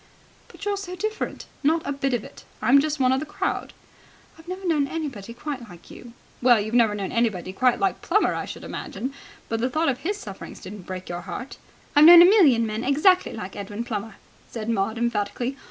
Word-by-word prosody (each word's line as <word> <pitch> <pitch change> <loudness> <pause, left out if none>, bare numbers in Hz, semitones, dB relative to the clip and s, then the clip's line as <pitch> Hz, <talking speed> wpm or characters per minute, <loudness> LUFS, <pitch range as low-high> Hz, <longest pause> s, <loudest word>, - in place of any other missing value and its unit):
"But - - -11
you're 405 -1 0
so 370 -2 -6
different." 430 +4 -4 0.2
"Not 315 +3 +1
a - - -2
bit 275 -2 -1
of 225 - -3
it. - - -13 0.2
I'm 275 +3 +5
just 305 0 -2
one 255 -1 +3
of 260 - +2
the - - -3
crowd." - - -3 0.6
"I've 320 +1 -17
never 370 +1 -6
known 305 -5 +2
anybody 275 -10 -5
quite 250 -1 -6
like 175 -1 -14
you." 240 -1 -12 0.3
"Well, 245 -2 +5
you've 215 +2 -4
never 230 -4 +4
known 195 -2 -4
anybody 205 -6 -1
quite 250 +4 +2
like 390 -1 0
Plummer, - - +2
I - - -3
should - - -8
imagine. 260 +3 -5 0.3
But 225 - -2
the 250 +3 0
thought 315 +4 +1
of 250 - -2
his 405 +5 -2
sufferings 195 - -9
didn't 190 -1 -10
break 185 0 -6
your 175 0 -5
heart." 200 +8 -7 0.4
"I've 295 +1 +8
known 345 +1 +11
a - - +8
million 315 - +5
men 215 +1 -3
exactly 305 +8 +3
like 195 -4 -7
Edwin 205 +3 -5
Plummer," 220 -2 -5 0.3
said 225 -1 -5
Maud 220 +1 -1
emphatically. 235 +2 -1
245 Hz, 210 wpm, -24 LUFS, 215-310 Hz, 0.6 s, known